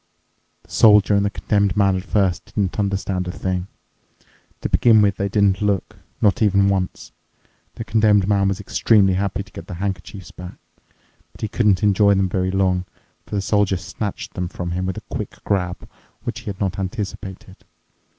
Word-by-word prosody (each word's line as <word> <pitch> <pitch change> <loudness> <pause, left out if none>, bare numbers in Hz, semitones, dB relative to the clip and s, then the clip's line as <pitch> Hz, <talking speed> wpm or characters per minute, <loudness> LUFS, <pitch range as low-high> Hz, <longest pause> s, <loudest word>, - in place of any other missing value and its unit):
The - - -22
Soldier 105 -2 +5
and 100 0 +3
the 100 - +1
Condemned 100 -1 0
Man 100 -2 +3
at 95 - -3
first 95 -3 0
didn't 100 -1 -2
understand 95 -2 -1
a - - -2
thing. 90 0 -3 0.9
To - - -2
begin 110 -3 +5
with 100 -1 +2
they 100 0 -1
didn't 100 -1 +2
look, 100 -3 -1 0.2
not 100 -1 +2
even 100 -2 +4
once. 95 -2 -2 0.6
The - - -5
Condemned 105 -3 +3
Man 100 -1 +2
was 100 0 -1
extremely 100 -1 +3
happy 100 +1 -1
to 95 - -21
get 85 - -10
the 90 - -6
handkerchiefs 95 -1 -5
back, 90 0 -10 0.7
but - - -17
he 110 - -1
couldn't 105 -2 +2
enjoy 100 0 +4
them 95 -1 +1
very 95 0 0
long, 95 -1 +1 0.4
for - - -5
the 100 - 0
Soldier 100 -2 +2
snatched 100 +2 -6
them 90 -1 -3
from 90 0 -5
him 90 +1 -2
with 95 - -3
a - - -5
quick - - -5
grab, 90 -3 -2 0.4
which 120 -1 -4
he 120 - -16
had 100 -3 -5
not 95 -2 -2
anticipated. 95 -1 -6
100 Hz, 180 wpm, -21 LUFS, 95-105 Hz, 0.9 s, Soldier